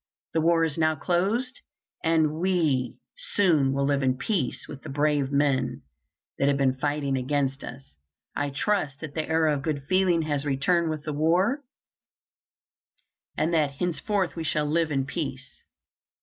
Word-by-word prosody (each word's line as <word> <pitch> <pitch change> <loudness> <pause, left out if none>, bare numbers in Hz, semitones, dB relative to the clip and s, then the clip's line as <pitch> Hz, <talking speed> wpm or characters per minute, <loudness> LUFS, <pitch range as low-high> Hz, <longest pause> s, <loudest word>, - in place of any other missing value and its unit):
The 160 - +2
war 165 0 +3
is 160 -1 -1
now 155 0 +3
closed, 200 - 0 0.4
and 160 -2 +2
we 160 -9 +1 0.2
soon 185 - +2
will 140 0 0
live 140 0 +1
in 130 -1 +1
peace 170 - -1
with 140 - -9
the - - -9
brave 145 -1 +1
men 140 -2 +1 0.6
that 140 - +3
have 140 -1 +3
been 135 -2 +2
fighting 145 0 -1
against 135 +1 -1
us. 135 +3 -10 0.4
I 145 0 -1
trust 145 -1 -1
that 155 -3 -6
the 155 0 -3
era 160 -1 +3
of 140 - -2
good 145 -1 -2
feeling 185 -3 +3
has 145 -2 -1
returned 155 +5 +1
with 155 -1 -4
the 155 - -3
war, 180 - +2 1.8
and 165 +2 +1
that 150 -4 +2
henceforth 180 +4 -1
we 165 - -4
shall 150 -1 0
live 160 +2 +1
in 135 -3 0
peace. 135 - -5
150 Hz, 160 wpm, -26 LUFS, 140-170 Hz, 1.8 s, war